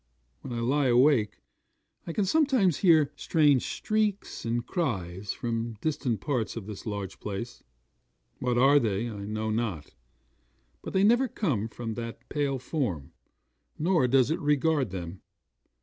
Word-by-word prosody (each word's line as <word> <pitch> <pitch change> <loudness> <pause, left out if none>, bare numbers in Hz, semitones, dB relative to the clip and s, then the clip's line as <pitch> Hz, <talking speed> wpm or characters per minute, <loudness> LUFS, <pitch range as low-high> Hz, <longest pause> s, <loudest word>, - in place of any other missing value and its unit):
When - - -8
I 120 -1 -2
lie 135 +4 +2
awake, 125 -3 +3 0.7
I - - -2
can 200 +4 0
sometimes 255 - +3
hear 160 -6 +4
strange 145 -5 +3
shrieks 215 - -2
and 120 +1 -1
cries 100 - -2
from 115 -1 -3
distant 135 -8 -1
parts 125 -7 -2
of 115 -4 -6
this 105 +2 -8
large 100 -3 -5
place. 105 +4 -6 0.8
What 125 -1 0 0.3
they 110 0 -1
are, 115 - -6
I 100 -1 -6
know 110 +1 -2
not; 110 -9 -3 0.9
but - - -7
they 190 - +3
neither 240 +5 +4
come 140 - -1
from 115 0 -6
that 115 +1 -7
pale 140 -2 0
form, 120 - -3 0.7
nor 165 -4 +2
does 130 +2 +3
it 165 - 0
regard 150 - +1
them. 90 0 -7
125 Hz, 145 wpm, -28 LUFS, 110-155 Hz, 0.9 s, hear